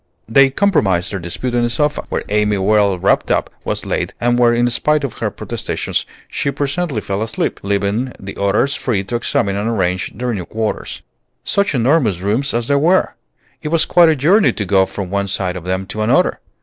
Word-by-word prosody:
They 135 Hz, +5 st, +5 dB
compromised 105 Hz, -, +1 dB
their 100 Hz, -, -3 dB
dispute 90 Hz, +9 st, -4 dB
on 120 Hz, -1 st, +2 dB
a 120 Hz, -, +1 dB
sofa, 150 Hz, +5 st, -1 dB
where -, -, -2 dB
Amy, 105 Hz, 0 st, +1 dB
well 100 Hz, 0 st, +2 dB
wrapped -, -, +1 dB
up, -, -, 0 dB
was -, -, -3 dB
laid, -, -, -2 dB
and 120 Hz, 0 st, +1 dB
where, 120 Hz, -1 st, +5 dB
in 120 Hz, +1 st, +2 dB
spite 150 Hz, +5 st, +1 dB
of 135 Hz, -, -5 dB
her -, -, 0 dB
protestations, -, -, -3 dB, 0.2 s
she -, -, -2 dB
presently 140 Hz, -1 st, -2 dB
fell 100 Hz, +1 st, -3 dB
asleep, 110 Hz, -, -2 dB
leaving 100 Hz, +5 st, -1 dB
the 95 Hz, 0 st, -8 dB
others 100 Hz, +8 st, +1 dB
free 110 Hz, -10 st, -1 dB
to 100 Hz, +5 st, -4 dB
examine 100 Hz, -4 st, 0 dB
and 105 Hz, +3 st, -1 dB
arrange 95 Hz, -4 st, -1 dB
their 120 Hz, +2 st, -2 dB
new 95 Hz, -5 st, -4 dB
quarters. 110 Hz, +2 st, -4 dB, 0.4 s
Such 200 Hz, -6 st, +1 dB
enormous 120 Hz, -, +2 dB
rooms 110 Hz, +9 st, 0 dB
as 120 Hz, 0 st, -1 dB
they 140 Hz, -, +3 dB
were! 170 Hz, +6 st, +2 dB, 0.5 s
It 155 Hz, -, -5 dB
was 160 Hz, +1 st, +2 dB
quite 175 Hz, -2 st, +5 dB
a 160 Hz, -, +3 dB
journey 150 Hz, -, +3 dB
to 105 Hz, -, -3 dB
go 95 Hz, 0 st, +3 dB
from 95 Hz, -3 st, -6 dB
one 100 Hz, 0 st, -1 dB
side 95 Hz, -2 st, -2 dB
of 90 Hz, -2 st, -7 dB
them 95 Hz, +1 st, -2 dB
to 110 Hz, +3 st, -5 dB
another. 110 Hz, +2 st, +2 dB
115 Hz, 200 wpm, -17 LUFS, 100-140 Hz, 0.5 s, They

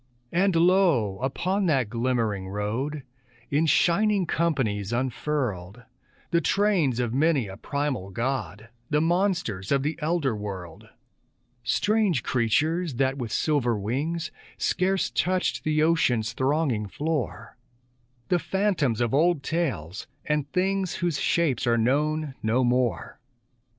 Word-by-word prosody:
And 185 Hz, +1 st, +2 dB
lo! 165 Hz, -, +3 dB
upon 180 Hz, +9 st, -1 dB
that 135 Hz, -7 st, +2 dB
glimmering 115 Hz, -5 st, -1 dB
road, 115 Hz, +9 st, -3 dB, 0.5 s
In 150 Hz, +3 st, +2 dB
shining 195 Hz, +5 st, +3 dB
companies 130 Hz, -, 0 dB
unfurled, 120 Hz, -5 st, -2 dB, 0.5 s
The 170 Hz, -1 st, +3 dB
trains 185 Hz, -, +2 dB
of 120 Hz, -2 st, -1 dB
many 140 Hz, -4 st, +2 dB
a 95 Hz, -, -8 dB
primal 140 Hz, -4 st, -3 dB
god, 115 Hz, -1 st, -3 dB, 0.2 s
The 150 Hz, -, +2 dB
monsters 170 Hz, -, 0 dB
of 140 Hz, -1 st, +2 dB
the 155 Hz, +3 st, -2 dB
elder 150 Hz, -6 st, 0 dB
world; 95 Hz, -5 st, -7 dB, 0.7 s
Strange 205 Hz, -, +1 dB
creatures 150 Hz, +7 st, +1 dB
that, 135 Hz, +2 st, +1 dB
with 120 Hz, -3 st, -4 dB
silver 125 Hz, -7 st, +1 dB
wings, 145 Hz, -, -2 dB, 0.3 s
Scarce 190 Hz, +1 st, 0 dB
touched 185 Hz, 0 st, 0 dB
the 155 Hz, 0 st, +2 dB
ocean's 125 Hz, -9 st, +2 dB
thronging 130 Hz, -5 st, 0 dB
floor, 130 Hz, -4 st, -3 dB, 0.7 s
The 180 Hz, -, +3 dB
phantoms 170 Hz, -, 0 dB
of 120 Hz, 0 st, 0 dB
old 160 Hz, 0 st, +3 dB
tales, 105 Hz, -, -3 dB, 0.2 s
and 150 Hz, -2 st, -1 dB
things 190 Hz, 0 st, 0 dB
Whose 170 Hz, -5 st, -1 dB
shapes 150 Hz, -9 st, +1 dB
are 115 Hz, 0 st, +3 dB
known 150 Hz, +5 st, +1 dB
no 115 Hz, +4 st, +1 dB
more. 125 Hz, -1 st, 0 dB
140 Hz, 120 wpm, -26 LUFS, 115-170 Hz, 0.7 s, lo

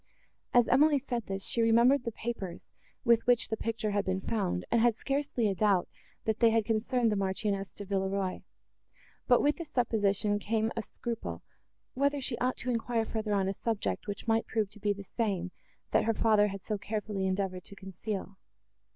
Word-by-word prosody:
As 245 Hz, -1 st, +5 dB
Emily 290 Hz, +3 st, +5 dB
said 245 Hz, -4 st, -3 dB
this, 195 Hz, 0 st, -3 dB
she 235 Hz, -, +1 dB
remembered 235 Hz, +4 st, +4 dB
the 235 Hz, -, -1 dB
papers, 215 Hz, -6 st, -5 dB, 0.4 s
with 235 Hz, -1 st, +4 dB
which 245 Hz, -1 st, +3 dB
the 220 Hz, -, 0 dB
picture 220 Hz, -1 st, -2 dB
had 205 Hz, 0 st, +1 dB
been 185 Hz, -1 st, -1 dB
found, 190 Hz, -3 st, -1 dB
and 235 Hz, -, +4 dB
had 235 Hz, -1 st, +4 dB
scarcely 275 Hz, -3 st, -1 dB
a 200 Hz, -, +1 dB
doubt, 195 Hz, -2 st, +2 dB, 0.4 s
that 220 Hz, 0 st, 0 dB
they 230 Hz, -, +6 dB
had 225 Hz, -1 st, +2 dB
concerned 230 Hz, +1 st, +1 dB
the -, -, +1 dB
Marchioness 195 Hz, 0 st, -1 dB
de 205 Hz, -, -7 dB
Villeroi; 195 Hz, -1 st, -1 dB, 0.9 s
but 245 Hz, -1 st, +5 dB
with 295 Hz, 0 st, +3 dB
this 335 Hz, -3 st, -7 dB
supposition 205 Hz, -3 st, +1 dB
came 220 Hz, +2 st, 0 dB
a 225 Hz, -, -1 dB
scruple, 230 Hz, +1 st, -5 dB, 0.5 s
whether 280 Hz, +2 st, +1 dB
she 260 Hz, -2 st, -3 dB
ought 255 Hz, +1 st, 0 dB
to 250 Hz, -, -2 dB
enquire 230 Hz, -1 st, 0 dB
further 215 Hz, -1 st, -2 dB
on 195 Hz, -1 st, +1 dB
a 195 Hz, -, 0 dB
subject, 195 Hz, -, -2 dB
which 205 Hz, +3 st, -5 dB
might 225 Hz, 0 st, +2 dB
prove 215 Hz, -3 st, -1 dB
to 215 Hz, -, -13 dB
be 205 Hz, 0 st, +1 dB
the 200 Hz, 0 st, -4 dB
same, 190 Hz, -4 st, -2 dB, 0.4 s
that -, -, +3 dB
her 225 Hz, 0 st, +1 dB
father 215 Hz, -2 st, +4 dB
had 195 Hz, -1 st, -6 dB
so 210 Hz, +1 st, -3 dB
carefully 210 Hz, -2 st, -2 dB
endeavoured 185 Hz, -1 st, -2 dB
to 200 Hz, -, -10 dB
conceal. 195 Hz, 0 st, -6 dB
215 Hz, 190 wpm, -30 LUFS, 195-235 Hz, 0.9 s, they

